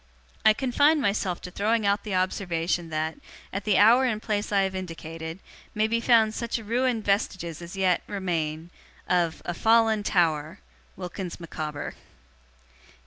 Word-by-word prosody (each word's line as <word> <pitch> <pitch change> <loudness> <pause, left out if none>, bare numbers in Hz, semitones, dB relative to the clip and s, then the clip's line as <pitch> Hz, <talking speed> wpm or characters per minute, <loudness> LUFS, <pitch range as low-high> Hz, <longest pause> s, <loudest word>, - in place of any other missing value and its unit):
I 215 - +7
confine 285 +6 +3
myself 200 -6 0
to 180 - -8
throwing 215 +3 +1
out 200 +1 +2
the 205 -3 -3
observation, 175 -2 -1
that, 155 0 -2 0.3
at 200 +1 -4
the 210 -3 +3
hour 230 +6 +6
and 225 -4 0
place 210 -1 -2
I 200 -1 +3
have 190 0 -1
indicated, 165 -2 -6 0.4
may 215 +1 +2
be 230 +1 +1
found 225 -2 +4
such 235 +1 -2
ruined 235 +1 -1
vestiges 190 -5 -1
as 175 +3 -8
yet 185 -2 +2
'Remain, 170 -4 -3 0.4
'Of 170 -3 +1
'A 175 - -2
'Fallen 225 +2 +3
Tower, 165 -3 +1 0.4
'WILKINS 180 -1 -6
MICAWBER. 155 -3 -5
195 Hz, 145 wpm, -26 LUFS, 170-220 Hz, 0.4 s, I